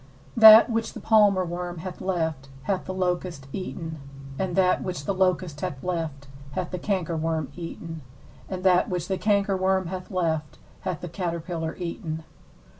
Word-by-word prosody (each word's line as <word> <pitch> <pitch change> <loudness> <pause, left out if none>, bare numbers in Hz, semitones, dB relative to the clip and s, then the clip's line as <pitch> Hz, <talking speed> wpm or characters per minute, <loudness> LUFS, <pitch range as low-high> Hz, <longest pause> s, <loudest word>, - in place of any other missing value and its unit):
4That 220 0 +10
which 225 0 -1
the - - -7
palmerworm 185 -5 +2
hath 185 +1 -7
left 160 -7 -2
hath 190 +5 -1
the - - -4
locust 180 -5 -2
eaten; 165 -4 -5 0.4
and 185 -2 -1
that 185 -1 +3
which 180 -6 -4
the 200 - 0
locust 185 -5 0
hath 160 -8 -4
left 160 -6 -3 0.3
hath 180 - -3
the 180 - -3
cankerworm 165 -6 -1
eaten; 165 -1 -7 0.5
and 185 -1 -4
that 180 -1 +4
which 180 -2 -2
the 190 -1 -1
cankerworm 190 -3 +2
hath 185 0 -6
left 160 -5 -1 0.2
hath 185 -5 -4
the 175 - -5
caterpiller 170 -2 -3
eaten. 170 -2 -4
180 Hz, 150 wpm, -26 LUFS, 165-190 Hz, 0.5 s, 4That